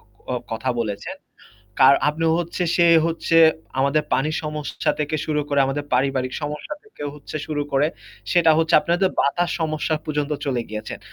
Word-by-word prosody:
ক - - -28 0.3
আ - - 0 0.2
কথা 115 +4 -3
বলেছেন। 105 -3 -4 0.6
কার 135 +1 +8
আপনি 160 +2 -2
হচ্ছে 175 +1 -4
সে 175 - +4 0.2
হচ্ছে 165 0 -1 0.4
আমাদের 140 +3 +2
পানি 150 +3 +1
সমস্যা 150 -1 -2
থেকে 150 +1 -1
শুরু 150 -1 0
করে 140 -1 +2
আমাদের 140 +2 -3
পারিবারিক 130 0 0
সমস্যা 150 - -5
থেকে 430 - -11
হচ্ছে 150 +1 -10
শুরু 150 -1 -2
করে 140 +2 +3 0.4
সেটা 170 -2 +5
হচ্ছে 165 +1 +3
আপনাদের 175 +3 +1
বাতাস 175 +5 +1
সমস্যা 155 0 -1
পর্যন্ত 150 -1 -2
চলে 130 -4 0
গিয়েছেন। 110 0 -6
150 Hz, 160 wpm, -22 LUFS, 135-160 Hz, 0.6 s, কার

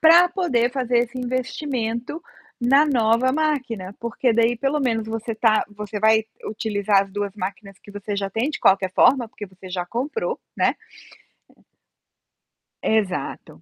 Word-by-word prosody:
pra 340 +2 +7
poder 260 -11 +1
fazer 250 -2 +1
esse 240 +1 -3
investimento 250 +1 -3 0.4
na 275 +5 +5
nova 240 -1 +3
máquina, 255 -11 -1
porque 235 +1 0
daí 230 +1 +3
pelo 275 +4 0
menos 225 -4 0
você 225 0 -4
tá 220 -1 +3
você 210 0 -5
vai 220 +1 +5 0.2
utilizar 205 -2 +1
as 195 - -11
2 205 -1 -3
máquinas 195 0 -6
que - - -13
você 205 0 -5
já 195 -1 -2
tem 225 +8 0
de 310 - -5
qualquer 190 -1 +3
forma, 245 0 +4
porque 210 - -8
você 185 -1 -13
já 180 -1 -3
comprou, 270 - -3 0.2
né - - +2 2.1
Exato. 185 - -2
230 Hz, 145 wpm, -23 LUFS, 205-255 Hz, 2.1 s, pra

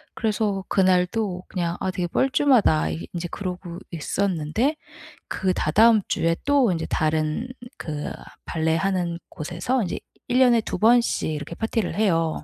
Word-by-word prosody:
그래서 210 -3 -1
그날도 185 0 +1
그냥 175 -2 -2
'아 190 - 0
되게 180 -1 -2
뻘쭘하다.' 250 - +3 0.2
인제 175 0 -4
그러고 180 -3 -5
있었는데 185 - -1 0.5
그 185 -1 0
다다음 220 +8 +4
주에 165 0 +1
또 280 -6 +4
인제 165 -2 -2
다른 155 +7 0 0.3
그 150 -2 -5 0.3
발레하는 170 +2 0
곳에서 175 - -2
이제 180 - -3 0.3
1 245 +1 +2
년에 245 -3 +6
2 - - -4
번씩 235 -7 +3
이렇게 150 +2 -5
파티를 225 -2 -2
해요. 165 -7 +1
185 Hz, 275 characters per minute, -24 LUFS, 165-220 Hz, 0.5 s, 년에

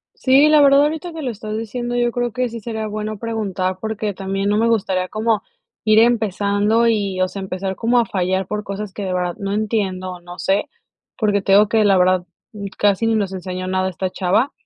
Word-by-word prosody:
Sí, 275 +3 +5
la 305 -1 +6
verdad 280 0 +6
ahorita 320 +3 -2
que 320 -1 -7
lo 255 - -2
estás 215 -1 -6
diciendo 240 +2 -4
yo 240 -1 +1
creo 245 -1 -1
que 250 +1 -1
sí 230 0 -7
sería 220 0 -4
bueno 215 0 -4
preguntar 195 -5 -2
porque 215 -1 -3
también 195 +1 -2
no 210 +1 +2
me 230 - +3
gustaría 190 -5 0
como, 220 -1 0 0.4
ir 215 0 +5
empezando, 215 -1 +2
y, 200 -4 0
o 185 - +2
sea, 200 - -7
empezar 190 0 -4
como 240 +2 +2
a 235 - +3
fallar 190 -2 -1
por 210 +1 -4
cosas 200 0 -5
que 205 - -6
de 185 -1 -2
verdad 180 -1 -1
no 200 -2 -3
entiendo, 200 -4 -1
o, 180 - -10
no 175 +1 -11
sé, 195 +2 0 0.5
porque 205 -3 +1
te 195 - 0
digo 205 +1 +6
que 220 -1 +2
la 195 -2 +4
verdad, 180 0 +3 0.3
mm, 205 -2 -6
casi 205 +1 +2
ni 225 - +2
nos 200 -3 0
enseñó 185 0 -5
nada 185 0 0
esta 185 0 -3
chava. 205 - +1
210 Hz, 220 wpm, -20 LUFS, 190-230 Hz, 0.5 s, la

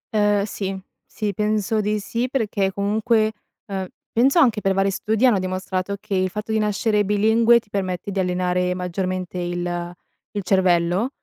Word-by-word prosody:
Uhm, 205 -1 +3
sì, 195 -2 -4 0.3
sì 210 -2 -3
penso 215 +1 0
di 210 +1 0
sì, 235 +5 -2
perché 210 -7 0
comunque 215 +2 +1 0.3
uhm, 190 -2 -4 0.2
penso 265 +7 +3
anche 235 -9 +4
per 195 0 +2
vari 195 0 +2
studi, 220 +5 0
hanno 235 -6 +4
dimostrato, 185 +1 -2
che 200 - -6
il 185 0 +1
fatto 210 +3 -5
di 220 - +2
nascere 210 0 +1
bilingue 220 +3 +4
ti 215 - -24
permette 190 0 -3
di 195 - -2
allenare 180 0 0
maggiormente 180 0 -3
il 175 0 -3 0.4
il 205 - -1
cervello, 180 +3 +2
200 Hz, 160 wpm, -22 LUFS, 185-215 Hz, 0.4 s, anche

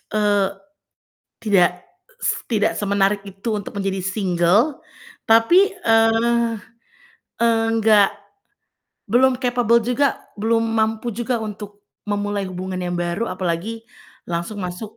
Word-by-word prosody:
eee, 205 -2 +2 1.0
tidak, 180 -4 +2 0.4
s - - +2 0.2
tidak 215 -3 +1
semenarik 200 0 +1
itu 195 +4 -6
untuk 205 - -8
menjadi 195 -1 -2
single, 190 - +1 0.5
tapi, 345 - +5
eee, 225 +1 +3 1.0
enggak 225 -3 +3 1.0
belum 255 +2 +4
capable 245 -2 +2
juga 260 +4 +1 0.2
belum 225 +1 +1
mampu 225 +1 -1
juga 240 +3 -2
untuk 205 -1 -8 0.2
memulai 205 -1 -1
hubungan 185 0 -5
yang 175 -1 -3
baru, 175 +6 -2
apalagi 185 +5 -3 0.4
langsung 175 +5 -4
masuk 180 +5 -7
210 Hz, 105 wpm, -21 LUFS, 195-230 Hz, 1.0 s, tapi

